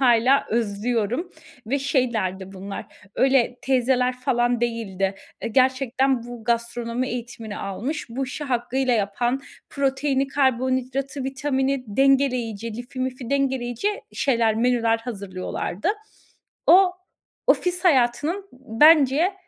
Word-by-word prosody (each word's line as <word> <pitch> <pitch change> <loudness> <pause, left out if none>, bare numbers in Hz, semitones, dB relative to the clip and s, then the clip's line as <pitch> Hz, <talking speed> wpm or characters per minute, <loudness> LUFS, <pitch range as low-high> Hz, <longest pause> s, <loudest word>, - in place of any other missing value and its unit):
hâlâ 250 +2 +4
özlüyorum 230 - -1 0.4
ve 275 +5 0
şeylerdi 220 -9 -1
bunlar 195 +1 -7 0.3
öyle 260 -2 +2
teyzeler 255 -1 +2
falan 240 -1 +1
değildi. 200 -5 -1 0.3
E, - - -3
gerçekten 260 +1 +2
bu 240 -1 -9
gastronomi 235 +1 -1
eğitimini 235 -3 -6
almış, 240 +11 -4
bu 255 +4 -3
işi 265 +3 -6
hakkıyla 255 0 0
yapan 235 +5 0 0.3
proteini, 275 0 0
karbonhidratı, 260 0 0
vitamini 270 -1 -1
dengeleyici 240 -3 +1
lifi 245 +2 -7
mifi 255 -2 -4
dengeleyici 265 - 0 0.2
şeyler, 230 -5 +2
menüler 230 -1 +2
hazırlıyorlardı. 200 - -4 0.8
O, 370 +1 +7 0.5
ofis 360 +1 +1
hayatının, 275 0 +3
ııı, 400 -1 -12 0.3
bence 310 +3 +6
250 Hz, 105 wpm, -23 LUFS, 230-270 Hz, 0.8 s, O